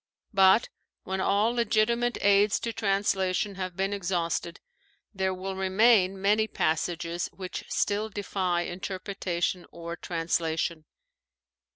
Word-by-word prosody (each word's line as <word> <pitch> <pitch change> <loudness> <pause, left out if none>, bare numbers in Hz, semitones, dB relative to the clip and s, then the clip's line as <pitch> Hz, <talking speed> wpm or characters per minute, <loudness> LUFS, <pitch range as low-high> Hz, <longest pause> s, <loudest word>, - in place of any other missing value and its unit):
But, 195 +3 +5 0.3
when 190 0 -3
all 205 +4 +2
legitimate 235 +1 +1
aids 200 +1 +4
to 230 - -3
translation 195 -1 0
have 185 -2 -5
been 195 +1 0
exhausted, 175 -3 -2 0.5
there 190 -1 0
will 190 +1 -5
remain 190 0 +3
many 210 +3 +2
passages 170 0 -1
which 185 -2 -7
still 210 +2 0
defy 185 -4 -1
interpretation 185 -1 -3
or 170 0 -6
translation. 165 -1 -2
190 Hz, 105 wpm, -28 LUFS, 175-205 Hz, 0.5 s, But